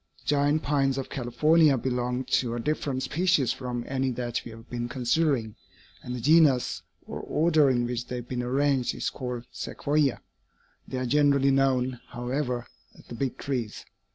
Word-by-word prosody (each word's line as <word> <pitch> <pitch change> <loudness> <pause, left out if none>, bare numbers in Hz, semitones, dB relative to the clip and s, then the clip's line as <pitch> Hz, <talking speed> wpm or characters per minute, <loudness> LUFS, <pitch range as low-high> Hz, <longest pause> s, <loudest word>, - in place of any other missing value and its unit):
The - - -6
giant 145 +1 +2
pines 135 -2 +1
of 135 - -5
California 145 +4 +3
belong 125 0 -1
to 120 -2 0
a - - -3
different 135 0 -2
species 175 -6 +2
from 125 -2 -5
any 135 0 0
that 120 -1 -3
we - - -9
have 115 +1 -12
been 120 0 -4
considering, 125 -2 0 0.5
and 125 - -5
the - - -4
genus, 135 - +4 0.2
or - - -6
order, 155 -2 +3
in 120 -2 +1
which 120 0 -3
they 125 - -4
have 120 -1 -6
been 125 -1 -3
arranged 135 +1 +1
is - - -2
called 125 -2 -5
Sequoia. 145 -2 0 0.7
They 130 - -4
are 130 - -1
generally 140 +1 +3
known, 130 -2 +1
however, 125 0 -3 0.3
as - - -17
the - - -7
'Big 130 +2 -3
Trees.' 125 -6 -4
130 Hz, 170 wpm, -27 LUFS, 120-145 Hz, 0.7 s, genus